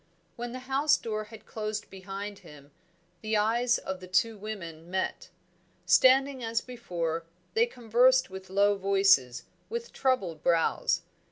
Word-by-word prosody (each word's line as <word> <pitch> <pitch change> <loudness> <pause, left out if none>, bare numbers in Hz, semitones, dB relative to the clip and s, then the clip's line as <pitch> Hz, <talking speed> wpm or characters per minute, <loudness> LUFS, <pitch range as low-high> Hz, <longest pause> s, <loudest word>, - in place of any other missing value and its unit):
When 240 0 -5
the 255 +1 -7
house 285 +3 +3
door 215 -2 -4
had 215 0 -13
closed 215 -1 -5
behind 195 +2 -7
him, 150 -5 -15 0.5
the 215 0 0
eyes 235 +3 +2
of 190 -1 -5
the 185 - -10
two 220 +5 +2
women 175 -6 -8
met. 185 +1 -3 0.6
Standing 265 0 +4
as 225 0 0
before, 170 -10 -4 0.3
they 460 +2 +3
conversed 250 - +3
with 190 0 -9
low 200 +2 +3
voices, 195 -11 +3 0.3
with 470 +1 -5
troubled 195 - 0
brows. 165 -2 +1
210 Hz, 140 wpm, -29 LUFS, 185-245 Hz, 0.6 s, Standing